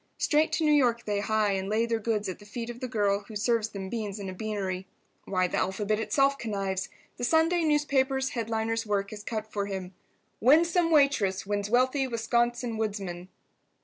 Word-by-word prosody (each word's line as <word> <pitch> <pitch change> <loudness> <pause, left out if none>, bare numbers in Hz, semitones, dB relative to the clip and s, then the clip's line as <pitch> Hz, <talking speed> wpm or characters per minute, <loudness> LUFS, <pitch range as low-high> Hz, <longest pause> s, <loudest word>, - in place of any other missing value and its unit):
Straight 305 +1 +2
to 325 - +1
New 300 - +4
York 240 -5 +2
they 205 -1 0
hie, 215 0 +1
and 195 0 -2
lay 220 +2 +2
their 230 -1 -1
goods 215 -1 -1
at 185 - -5
the - - -14
feet 235 +2 -5
of 240 - -11
the 255 - -3
girl 205 -4 0
who 220 - -10
serves 220 +1 +1
them 195 -2 -6
beans 210 -1 -4
in 200 -2 -5
a - - -5
beanery. 190 -2 -3 0.4
Why, 185 -1 +1
the - - -2
alphabet 205 +3 0
itself 275 +6 +2
connives. 195 -4 -2 0.3
The - - -6
Sunday 320 +7 +3
newspaper's 275 -3 +1
headliner's 225 -1 -1
work 205 -2 -1
is 210 - -7
cut 220 0 -4
for 200 -1 -1
him. 190 -2 -5 0.5
"Winsome 330 +6 +4
Waitress 275 - +3
Wins 205 0 -2
Wealthy 260 +3 +2
Wisconsin 235 0 0
Woodsman." 195 -5 -4
220 Hz, 185 wpm, -28 LUFS, 200-250 Hz, 0.5 s, New